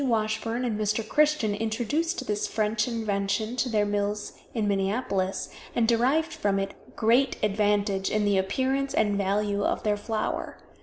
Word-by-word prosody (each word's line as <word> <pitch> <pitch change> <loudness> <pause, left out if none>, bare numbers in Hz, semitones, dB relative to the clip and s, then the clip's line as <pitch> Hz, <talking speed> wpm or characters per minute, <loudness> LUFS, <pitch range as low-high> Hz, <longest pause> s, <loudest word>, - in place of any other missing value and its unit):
Washburn 225 0 0
and 220 -3 -1
Mr. 215 +1 0
Christian 300 -8 +2
introduced 245 - -1
this 210 -2 -1
French 215 0 0
invention 215 -2 -1
into 250 +1 -1
their 210 -2 +2
mills 205 0 -2 0.2
in 220 -3 -1
Minneapolis, 195 -1 0 0.3
and 230 -1 +3
derived 270 +8 +2
from 205 -11 0
it 195 0 -6
great 245 +4 +3
advantage 205 -1 +1
in 215 -1 +1
the 200 -2 +3
appearance 265 +8 0
and 210 -2 +2
value 200 +1 0
of - - 0
their 210 -1 +1
flour. 215 +1 -3
215 Hz, 150 wpm, -27 LUFS, 205-240 Hz, 0.3 s, and